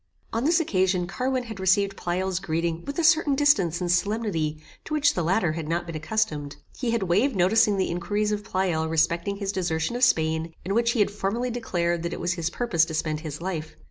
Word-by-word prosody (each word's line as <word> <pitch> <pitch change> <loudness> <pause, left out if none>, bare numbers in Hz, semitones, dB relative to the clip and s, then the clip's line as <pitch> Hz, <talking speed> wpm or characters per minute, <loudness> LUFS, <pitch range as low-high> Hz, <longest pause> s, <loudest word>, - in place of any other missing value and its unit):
On 230 +3 0
this 330 +3 +4
occasion 185 - +1
Carwin 255 +7 -2
had 220 -4 -8
received 195 +1 +2
Pleyel's 185 +1 -2
greeting 165 -2 -2
with 280 - -5
a 340 - +1
certain 315 -3 +4
distance 205 - +3
and 175 -1 -1
solemnity 180 -5 0 0.3
to 305 - -3
which 290 -1 +3
the 180 - -1
latter 175 0 +1
had 155 -1 -5
not 170 +1 -1
been 165 -1 -7
accustomed. 155 -4 -2 0.2
He 250 - -2
had 230 -3 0
waved 205 +9 +2
noticing 200 +3 +3
the 190 - 0
inquiries 205 +5 -1
of 210 0 -2
Pleyel 175 -5 -1
respecting 170 +4 +1
his 200 -1 -3
desertion 175 +1 -1
of 245 - -1
Spain, 160 -6 +2
in 195 - -1
which 235 +2 +2
he 230 - +2
had 205 - +2
formerly 210 +5 -2
declared 175 -8 -1
that 170 0 -3
it - - -5
was 175 0 0
his 170 -2 -2
purpose 210 -10 +1
to 160 - -5
spend 155 -1 -1
his 155 -1 -7
life. 160 -4 -4
185 Hz, 215 wpm, -25 LUFS, 165-225 Hz, 0.3 s, this